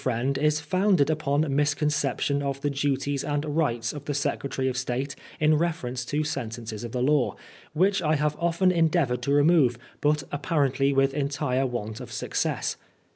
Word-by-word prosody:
friend 130 +2 0
is 150 +1 +2
founded 185 -1 +2
upon 150 -1 +1
misconception 145 -1 +1
of 140 -1 -2
the 145 - 0
duties 140 0 -1
and 145 +1 -1
rights 145 -7 0
of 145 -1 -8
the 145 - -2
Secretary 135 -1 -1
of 130 - -1
State 125 +2 -2 0.2
in 155 0 +4
reference 150 -7 -1
to 145 +5 -1
sentences 115 -7 -5
of 120 - -5
the 125 0 -1
law, 145 -1 +2 0.4
which 190 +5 +2
I 155 -1 +2
have 150 0 0
often 170 +2 +2
endeavoured 160 -7 +2
to 140 - -1
remove, 145 -4 +4 0.2
but 150 -1 +2
apparently 140 -2 +1
with 135 0 +2
entire 140 -2 0
want 110 -2 -4
of 125 - -9
success. - - -2
140 Hz, 165 wpm, -26 LUFS, 130-150 Hz, 0.4 s, in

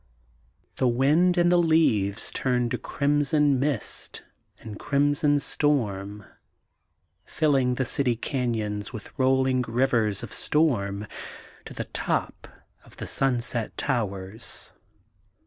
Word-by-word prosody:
The 130 - +2
wine 150 +9 +3
and 175 0 +4
the 175 - +5
leaves 115 - +2
turn 125 -2 0
to 125 - -2
crimson 145 -1 +1
mist 135 -5 -3 0.4
and 105 -2 -9
crim 145 +1 +2
son 145 -1 +2
storm, 105 -9 -1 1.0
filling 135 -5 +1
the 130 - -1
city 125 0 +2
canyons 110 -5 -3
with 110 -4 -9
rolling 130 0 +3
rivers 115 -4 +1
of 115 - -7
storm 105 -10 0 0.6
to - - -9
the - - -4
top - - -3 0.4
of - - -19
the - - -6
Sunset 120 -4 -1
Towers. 105 -4 -3
125 Hz, 115 wpm, -26 LUFS, 110-145 Hz, 1.0 s, the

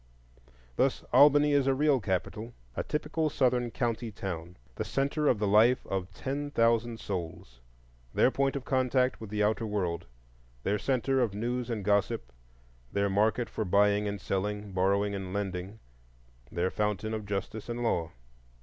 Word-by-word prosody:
Thus - - +1
Albany 145 +2 +7
is 140 -2 +3
a 135 - +3
real 145 -1 +3
capital,—a 95 - -4
typical 155 +1 -1
Southern 125 -3 +1
county 115 -1 -2
town, 90 -3 -6 0.2
the - - -3
centre 140 +2 0
of 120 - +4
the 105 - 0
life 110 +5 +4
of 95 0 -3
ten 140 +7 -4
thousand 115 -2 +2
souls; 80 -9 -6 0.5
their 130 - +3
point 135 0 0
of 140 -1 -4
contact 130 -1 +1
with 110 - -7
the 105 0 0
outer 110 +2 +1
world, 90 - -2 0.6
their 105 +1 0
centre 135 +2 +1
of 110 -5 0
news 120 +3 -2
and 110 -5 -3
gossip, 100 -12 +1 0.6
their 100 0 +1
market 110 +4 +2
for 110 - -3
buying 105 +2 +3
and 100 0 -3
selling, 105 +2 -2
borrowing 100 +2 +1
and 95 -2 -5
lending, 95 0 -3 0.7
their 90 +2 0
fountain 105 +1 -1
of 110 -2 -4
justice 100 +3 -4
and 120 +1 -3
law. 85 -8 0
105 Hz, 155 wpm, -29 LUFS, 100-125 Hz, 0.7 s, Albany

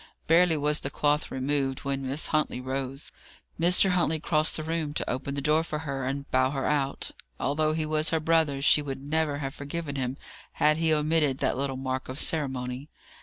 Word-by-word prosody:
Barely 165 0 +4
was 150 +1 +1
the 135 - -4
cloth 145 +1 +1
removed, 135 0 -1
when 135 -1 -3
Miss 140 +4 0
Huntley 155 -4 0
rose. 135 +2 -4 0.5
Mr. 180 +3 +5
Huntley 170 -3 +1
crossed 155 0 +1
the 155 - -4
room 160 -2 -2
to - - -2
open 135 +2 -3
the 140 - -3
door 155 +2 +3
for 155 -2 -4
her, 140 -4 -4
and 140 +1 -3
bow 130 0 +3
her 135 -1 -2
out. 140 -2 -1 0.3
Although 155 +2 +1
he 155 0 -1
was 155 0 +1
her 160 - +1
brother, 155 -3 +2
she 150 - +5
would 135 -2 -5
never 150 +1 -1
have 135 -1 -4
forgiven 145 0 -5
him, 130 0 -2 0.4
had 150 0 +3
he 160 -1 +1
omitted 150 -2 +2
that - - 0
little 135 0 -2
mark 130 0 -3
of 130 - -3
ceremony. 130 -3 -1
145 Hz, 195 wpm, -27 LUFS, 135-155 Hz, 0.5 s, Mr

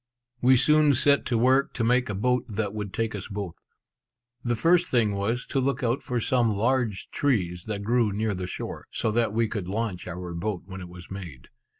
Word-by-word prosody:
We 130 +1 +6
soon 150 +1 +5
set 140 +3 +4
to 120 - +1
work 130 +4 +3
to 115 - -1
make 125 +1 +2
a 100 - -2
boat 125 +5 +1
that 105 -1 -2
would 105 -2 -4
take 115 +1 -2
us 100 -2 -5
both. 100 -4 -6 0.8
The 120 -1 0
first 175 +8 +3
thing 115 -5 +2
was 110 +5 -1
to 135 - -1
look 135 +1 0
out 120 +2 +1
for 125 -1 -2
some 115 -2 +2
large 115 -2 0
trees 90 -11 0
that 105 -2 -4
grew 115 0 +2
near 105 +1 -1
the 90 -1 -4
shore, - - -6
so 110 - -1
that 115 0 +1
we 115 +1 +1
could 100 -4 -4
launch 105 -3 -3
our 90 0 -6
boat 90 +2 -3
when 95 0 -8
it 90 - -8
was 90 0 -12
made. 90 -9 -8
110 Hz, 210 wpm, -26 LUFS, 100-125 Hz, 0.8 s, We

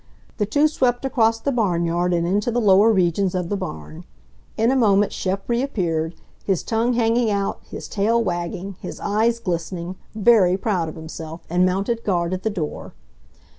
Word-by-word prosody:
The 210 - 0
two 290 +8 +3
swept 255 -4 0
across 225 -4 +2
the 280 - -1
barnyard 175 -6 0
and 170 -1 +1
into 200 +6 0
the 240 +1 0
lower 205 0 +5
regions 185 -1 +1
of 180 -2 -2
the 205 - 0
barn. 80 - -7 0.5
In 225 +3 +3
a - - +2
moment 205 -5 +3
Shep 195 +1 -3
reappeared, 180 - -1 0.3
his 190 -4 0
tongue 230 +2 0
hanging 230 0 +2
out, 200 -1 -1
his - - -7
tail 220 +3 +1
wagging, 180 +1 -4
his - - -7
eyes 220 +3 +1
glistening, 175 -2 -4 0.2
very 210 -4 +4
proud 190 -6 -1
of - - -9
himself, 160 0 -8
and 180 +1 +3
mounted 200 +5 -1
guard 175 -3 0
at 185 - -3
the 220 - 0
door. 165 -8 -5
195 Hz, 170 wpm, -22 LUFS, 175-225 Hz, 0.5 s, lower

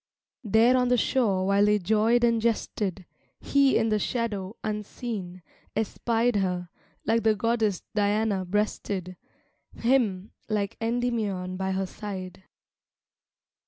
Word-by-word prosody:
There 225 +3 +4
on 250 -1 +2
the 250 0 +3
shore, 210 -7 +1
while 200 +1 +3
they 210 0 +4
joyed 220 +5 +2
and 230 -1 +3
jested, 205 -4 -1 0.3
He 280 -1 +3
in 225 0 +1
the 215 -1 +2
shadows, 210 -4 -2
unseen, 210 -4 -5 0.3
espied 225 +1 0
Her, 180 -2 -1 0.4
like 225 +1 +2
the 220 -1 +3
goddess 220 -3 0
Diana 205 -1 +1
breasted, 190 -1 -2 0.6
Him, 225 -6 +1 0.2
like 205 -2 -1
Endymion 225 -6 -1
by 190 0 -2
her 190 0 -1
side. 190 -2 -7
210 Hz, 120 wpm, -27 LUFS, 190-230 Hz, 0.6 s, There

